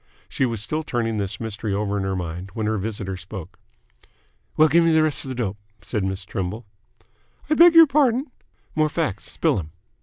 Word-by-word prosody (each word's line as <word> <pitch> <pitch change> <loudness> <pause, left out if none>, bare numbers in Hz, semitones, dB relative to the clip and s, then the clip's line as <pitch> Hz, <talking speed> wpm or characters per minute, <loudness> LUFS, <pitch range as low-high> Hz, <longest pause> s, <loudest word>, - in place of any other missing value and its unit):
She 130 - 0
was 115 -2 -3
still 155 +7 -2
turning 115 -6 -2
this 100 +1 -3
mystery 110 -2 -3
over 100 0 -1
in 100 - -1
her 95 0 -1
mind, 90 +1 -5
when 110 -2 -2
her 110 -1 0
visitor 100 -2 -4
spoke. 95 -1 -9 1.0
"Well, 155 - +7
gimme 165 +2 +4
th' 155 - +5
rest 155 -2 0
of 135 - -5
th' 130 - -6
dope," 105 -4 -2 0.2
said 105 -5 -2
Miss 95 0 -3
Trimble. 95 +5 -4 0.9
"I - - +6
beg 340 +1 +7
your 330 0 +10
pardon?" 270 -2 +2 0.4
"More 155 0 +2
facts. 155 - -3
Spill - - +1
'm!" 80 -3 -7
110 Hz, 190 wpm, -23 LUFS, 95-155 Hz, 1.0 s, your